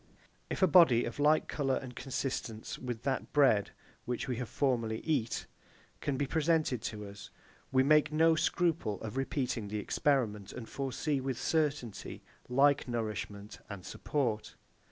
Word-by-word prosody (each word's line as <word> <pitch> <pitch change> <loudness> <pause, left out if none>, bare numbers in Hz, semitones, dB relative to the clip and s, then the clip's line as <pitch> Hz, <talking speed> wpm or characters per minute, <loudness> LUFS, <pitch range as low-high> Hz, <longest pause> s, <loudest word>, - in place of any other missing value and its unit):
If - - -1
a - - +7
body 145 -8 +6
of - - -6
like 150 +2 +4
colour 135 -3 0
and 125 -2 -6
consistence 125 -4 -4
with 120 -2 -5
that 135 -2 -2
bread, 130 -9 +4 0.4
which 125 +3 -3
we 125 -3 -2
have 125 -2 -4
formerly 115 -5 0
eat, 135 -8 -1 0.6
be 140 0 0
presented 155 -4 +1
to 105 -1 -5
us, 100 0 -10 0.4
we 130 0 +4
make 150 +2 +4
no 160 +1 +5
scruple 160 - 0
of 110 +1 -6
repeating 130 -4 -1
the 105 +1 -3
experiment, 105 -3 0
and 115 - -7
foresee, 140 +1 -2
with 130 -2 -3
certainty, 145 -8 -1 0.3
like 140 +2 +4
nourishment 105 -3 -4
and 100 -3 -8
support. 120 -7 -2
130 Hz, 145 wpm, -32 LUFS, 110-145 Hz, 0.6 s, a